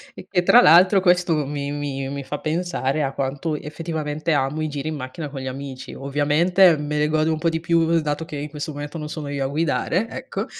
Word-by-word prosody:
E -, -, -11 dB
che 180 Hz, -2 st, +1 dB
tra 245 Hz, +7 st, +7 dB
l'altro 185 Hz, +5 st, +7 dB
questo 175 Hz, -4 st, +2 dB
mi 145 Hz, -1 st, -3 dB
mi 140 Hz, -2 st, -3 dB
mi 140 Hz, 0 st, -5 dB
fa 145 Hz, +2 st, -5 dB
pensare 155 Hz, -3 st, -1 dB
a 135 Hz, -2 st, 0 dB
quanto 140 Hz, +4 st, -2 dB
effettivamente 155 Hz, 0 st, -3 dB
amo 145 Hz, +2 st, 0 dB
i 155 Hz, -, -1 dB
giri 145 Hz, +1 st, -4 dB
in 155 Hz, -, -3 dB
macchina 140 Hz, +3 st, -6 dB
con 135 Hz, -2 st, -7 dB
gli 130 Hz, -, -5 dB
amici. 130 Hz, 0 st, -7 dB
Ovviamente 155 Hz, +6 st, +3 dB
me 150 Hz, 0 st, -3 dB
ne 150 Hz, -, +2 dB
godo 155 Hz, +1 st, +1 dB
un 155 Hz, -, -1 dB
po' 165 Hz, +1 st, +1 dB
di 160 Hz, -, -2 dB
più, 165 Hz, 0 st, +2 dB
dato 150 Hz, +1 st, -2 dB
che 155 Hz, -3 st, -7 dB
in 145 Hz, +1 st, -5 dB
questo 150 Hz, +1 st, -5 dB
momento 145 Hz, +2 st, -6 dB
non 150 Hz, -, -6 dB
sono 150 Hz, -2 st, -5 dB
io 140 Hz, -1 st, -2 dB
a -, -, 0 dB
guidare, 165 Hz, +7 st, 0 dB
ecco. -, -, -5 dB
150 Hz, 225 wpm, -22 LUFS, 140-165 Hz, -, tra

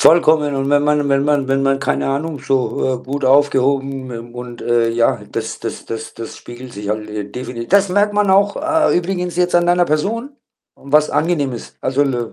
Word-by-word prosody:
Vollkommen 155 Hz, -3 st, +4 dB
und 135 Hz, +1 st, -1 dB
wenn 145 Hz, 0 st, +4 dB
man 150 Hz, 0 st, +2 dB
und 145 Hz, -, -1 dB
wenn 140 Hz, 0 st, +2 dB
man 145 Hz, -2 st, +1 dB
wenn 135 Hz, 0 st, +1 dB
man, 135 Hz, 0 st, +2 dB
keine 135 Hz, -, -1 dB
Ahnung, 145 Hz, +2 st, -2 dB
so, 130 Hz, 0 st, 0 dB
äh, -, -, -2 dB
gut 135 Hz, +2 st, -4 dB
aufgehoben, 135 Hz, -1 st, +2 dB
ähm, 120 Hz, 0 st, -8 dB
und, 120 Hz, -1 st, -8 dB
äh, 120 Hz, -1 st, +2 dB
ja, 115 Hz, 0 st, +1 dB
das -, -, -4 dB
das -, -, -6 dB
das 115 Hz, -1 st, -6 dB
das 115 Hz, -1 st, -8 dB
spiegelt 120 Hz, +1 st, -11 dB
sich 100 Hz, -1 st, -7 dB
halt, 105 Hz, 0 st, -3 dB
äh, 105 Hz, -1 st, -4 dB
defini 125 Hz, -2 st, -6 dB
das 200 Hz, 0 st, +4 dB
merkt 205 Hz, +2 st, +2 dB
man 205 Hz, -2 st, +2 dB
auch, 200 Hz, +1 st, +3 dB
äh, 320 Hz, 0 st, +2 dB
übrigens 180 Hz, -1 st, -3 dB
jetzt 180 Hz, 0 st, +1 dB
an 175 Hz, 0 st, +4 dB
deiner 175 Hz, 0 st, +4 dB
Person 215 Hz, -, -1 dB, 0.4 s
und 140 Hz, +1 st, -14 dB
was 150 Hz, 0 st, +4 dB
angenehm 150 Hz, -5 st, 0 dB
ist. 120 Hz, -, -9 dB
Also, 135 Hz, +2 st, +1 dB
I 120 Hz, -5 st, -2 dB
140 Hz, 215 wpm, -18 LUFS, 125-170 Hz, 0.4 s, Vollkommen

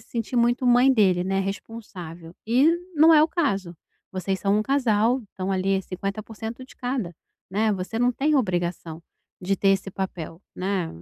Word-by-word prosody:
se 220 Hz, -, -22 dB
sentir 235 Hz, +1 st, -3 dB
muito 240 Hz, +2 st, +2 dB
mãe 245 Hz, +2 st, +6 dB
dele, 190 Hz, -7 st, +3 dB
né, 195 Hz, +1 st, 0 dB
responsável. 185 Hz, -5 st, -7 dB
E 250 Hz, +6 st, +4 dB, 0.3 s
não 320 Hz, +2 st, +7 dB
é 305 Hz, -, +7 dB
o 315 Hz, -, +3 dB
caso. 200 Hz, -, -1 dB, 0.4 s
Vocês 190 Hz, +1 st, -2 dB
são 200 Hz, +1 st, +2 dB
um 215 Hz, -, +1 dB
casal. 245 Hz, -2 st, +2 dB
Então, 190 Hz, 0 st, -4 dB
ali, 190 Hz, +1 st, +1 dB
é -, -, -1 dB
50%, 215 Hz, +6 st, -6 dB
de -, -, -18 dB
cada, 245 Hz, -9 st, -3 dB, 0.4 s
né. 215 Hz, +2 st, +1 dB
Você 195 Hz, +4 st, -4 dB
não 245 Hz, +1 st, +3 dB
tem 295 Hz, +5 st, +1 dB
obrigação 175 Hz, -6 st, -2 dB, 0.4 s
de 195 Hz, +2 st, 0 dB
ter 195 Hz, -, +1 dB
esse 195 Hz, 0 st, +1 dB
papel, 180 Hz, -3 st, -5 dB
né. 185 Hz, -2 st, -1 dB
200 Hz, 175 wpm, -24 LUFS, 185-245 Hz, 0.4 s, não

